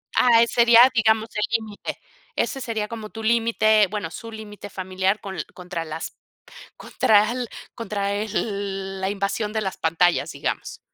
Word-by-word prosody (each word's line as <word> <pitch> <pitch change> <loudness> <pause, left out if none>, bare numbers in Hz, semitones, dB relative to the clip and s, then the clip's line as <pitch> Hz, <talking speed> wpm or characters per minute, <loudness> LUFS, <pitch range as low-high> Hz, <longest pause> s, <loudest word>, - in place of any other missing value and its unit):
Ah, 235 -2 +6
eh, - - +1
sería, 235 +1 +7
digamos, 220 -1 +2
el 210 - 0 0.2
límite, 215 -2 -7 0.4
ese 270 - -1
sería 220 -4 -2
como 220 -1 -7
tu 225 +1 -8
límite, 220 -2 +3
bueno, 205 -4 -4
su 230 +7 -9
límite 210 -2 -9
familiar, 190 +1 -1
con 195 -2 -7
l - - -4
contra 175 -2 -5
las 160 +1 -6 0.6
contra 210 0 +3
al 245 0 -3 0.3
contra 200 -3 -2
el 200 -2 -3
la 190 - 0
invasión 205 +2 -2
de 220 - 0
las 190 -2 -3
pantallas, 165 +2 +2
digamos. - - -4
210 Hz, 160 wpm, -23 LUFS, 195-225 Hz, 0.6 s, sería